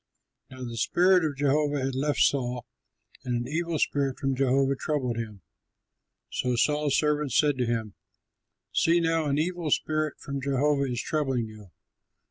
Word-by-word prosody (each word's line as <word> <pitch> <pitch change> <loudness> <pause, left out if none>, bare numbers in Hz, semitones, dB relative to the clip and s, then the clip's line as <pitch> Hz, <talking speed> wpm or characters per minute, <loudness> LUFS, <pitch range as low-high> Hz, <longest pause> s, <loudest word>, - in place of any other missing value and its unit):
Taylor] 130 -1 -9
Now - - -4
the 115 0 -6
spirit 180 - +4
of 150 -3 -2
Jehovah 145 0 +1
had 135 - -2
left 145 +3 0
Saul 125 -3 +1 0.6
and 125 -1 -2
an 120 0 -2
evil 165 +3 -1
spirit 140 -3 0
from 135 -1 -1
Jehovah 135 +1 +2
troubled 130 -5 -2
him. 105 -4 -6 0.9
So 125 -1 0
Saul's 150 +3 +2
servants 150 -2 +1
said 145 -2 +3
to 125 - +1
him, 115 -3 -2 0.8
"See 170 +1 +3
now, 165 -1 +1
an 140 -1 0
evil 170 0 -1
spirit 155 +1 0
from 140 -1 -5
Jehovah 140 0 +1
is 120 - -2
troubling 135 -6 0
you. 110 -3 -12
140 Hz, 160 wpm, -27 LUFS, 125-150 Hz, 0.9 s, spirit